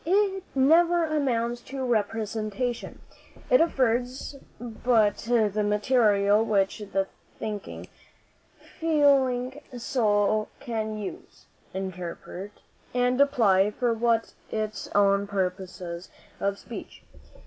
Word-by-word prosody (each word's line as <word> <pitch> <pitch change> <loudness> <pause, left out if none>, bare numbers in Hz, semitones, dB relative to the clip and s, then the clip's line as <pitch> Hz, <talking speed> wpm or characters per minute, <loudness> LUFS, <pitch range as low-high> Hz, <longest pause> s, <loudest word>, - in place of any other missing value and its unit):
It 385 +2 +2
never 335 +5 +4
amounts 240 -6 0
to 265 -1 -3
representation. 225 +1 -2 0.5
It - - +7
affords 255 -3 0 0.2
but 225 -2 +1
the 215 -3 +2
material 210 -1 +3
which 200 -2 +1
the 195 -2 -1 0.3
thinking, 210 -2 -6 0.9
feeling 275 -4 +2 0.2
soul 215 -3 +1
can 220 -4 -3
use, 210 -2 -8 0.3
interpret, 185 +1 -6 0.4
and 250 +2 +2
apply 210 -9 +4
for 235 +2 0 0.5
its 215 -1 -3
own 200 0 +4
purposes 185 -2 -4 0.3
of 200 0 -1
speech. - - -10
225 Hz, 90 wpm, -26 LUFS, 205-260 Hz, 0.9 s, It